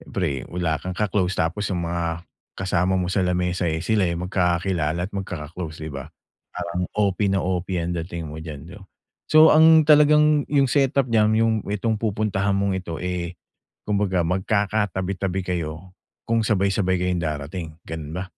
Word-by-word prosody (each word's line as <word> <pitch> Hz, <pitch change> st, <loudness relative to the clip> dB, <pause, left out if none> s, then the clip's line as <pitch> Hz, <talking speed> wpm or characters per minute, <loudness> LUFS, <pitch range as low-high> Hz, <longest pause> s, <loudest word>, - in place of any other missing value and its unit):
siyempre 75 Hz, -9 st, -3 dB
wala 85 Hz, -3 st, -1 dB
kang 90 Hz, 0 st, -6 dB
ka-close, 95 Hz, -3 st, 0 dB
tapos 95 Hz, +6 st, -1 dB
yung 90 Hz, -3 st, -2 dB
mga 85 Hz, 0 st, -3 dB, 0.3 s
kasama 95 Hz, 0 st, +1 dB
mo 90 Hz, 0 st, -1 dB
sa 100 Hz, -, +1 dB
lamesa, 90 Hz, -1 st, 0 dB
eh, 80 Hz, +2 st, -2 dB
sila 105 Hz, -5 st, +2 dB
yung 85 Hz, +1 st, -3 dB
magkakilala 90 Hz, -2 st, 0 dB
at -, -, -34 dB
magkaka-close, 80 Hz, -4 st, -6 dB
'di 80 Hz, -, -6 dB
ba? 70 Hz, +2 st, -7 dB, 0.5 s
Parang 90 Hz, +1 st, -3 dB
OP 100 Hz, -1 st, +1 dB
na 95 Hz, -2 st, 0 dB
OP 90 Hz, 0 st, -2 dB
ang 85 Hz, +1 st, -1 dB
dating 85 Hz, -2 st, -5 dB
mo 80 Hz, -, -7 dB
diyan 75 Hz, -4 st, -8 dB, 0.2 s
'no? -, -, -16 dB, 0.4 s
So 155 Hz, +1 st, +7 dB
ang 160 Hz, 0 st, +7 dB
talagang, 150 Hz, -1 st, +5 dB
yung 140 Hz, -2 st, +3 dB
set-up 140 Hz, -1 st, +3 dB
diyan 110 Hz, 0 st, +4 dB
yung 115 Hz, -, +2 dB, 0.2 s
itong 105 Hz, +1 st, -1 dB
pupuntahan 100 Hz, -2 st, 0 dB
mong 100 Hz, 0 st, 0 dB
ito, 85 Hz, -3 st, -6 dB
eh, 90 Hz, -1 st, -4 dB, 0.5 s
kumbaga 100 Hz, -4 st, 0 dB
magkakatabi-tabi 95 Hz, 0 st, -1 dB
kayo 85 Hz, +2 st, -5 dB, 0.3 s
kung 115 Hz, 0 st, +1 dB
sabay-sabay 95 Hz, -2 st, +1 dB
kayong 90 Hz, -1 st, 0 dB
darating, 80 Hz, +2 st, -5 dB
gano'n 80 Hz, -1 st, -6 dB
ba? 90 Hz, +1 st, -3 dB
90 Hz, 160 wpm, -23 LUFS, 85-105 Hz, 0.5 s, So